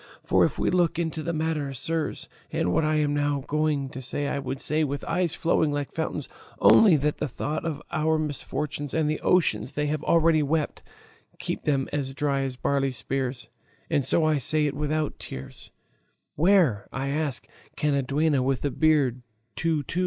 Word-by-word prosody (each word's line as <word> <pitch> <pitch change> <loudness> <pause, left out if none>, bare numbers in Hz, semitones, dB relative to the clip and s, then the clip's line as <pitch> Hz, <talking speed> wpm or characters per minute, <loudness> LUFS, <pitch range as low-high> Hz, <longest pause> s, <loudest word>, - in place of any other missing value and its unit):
For - - +3
if - - 0
we - - +1
look 175 -3 +2
into 160 -2 -2
the 170 - -2
matter, 155 -3 -2
sirs 160 +4 -2 0.2
(and 90 - 0
what - - +2
I 155 0 +1
am 150 -1 +1
now 145 -1 0
going 150 -2 0
to 130 - -7
say 140 +3 -1
I 140 - -1
would 135 0 -4
say 155 +2 +2
with 140 -1 -3
eyes 170 -1 0
flowing 160 -2 +1
like 145 -1 -3
fountains, 160 - -3 0.3
only 205 -7 +7
that 150 +1 0
the 150 - -1
thought 145 +4 -3
of 155 -3 -3
our 155 +1 +1
misfortune 145 -1 -3
and 160 -2 +2
the 155 0 -1
oceans 130 - +2
they 150 - -1
have 150 0 -2
already 165 -1 +4
wept, 150 +1 -1 0.6
keep - - -4
them 135 -3 +1
as 135 -2 -2
dry 140 -1 0
as 135 -1 -3
barley 135 +1 0
spears, 130 -1 -3 0.4
and 145 - +2
so 155 +5 +3
I 155 -2 +2
say 150 +4 +3
it 145 - -1
without 150 +1 -2
tears), 65 0 -8 0.6
where, 165 - +3
I 135 +1 -3
ask, 145 -2 -2 0.3
can 150 -1 0
a 140 - +2
duenna 140 +1 +1
with 135 +1 0
a 145 - 0
beard 145 -6 +2 0.3
go 160 -3 0
to? 170 - -4
150 Hz, 190 wpm, -26 LUFS, 135-155 Hz, 0.6 s, only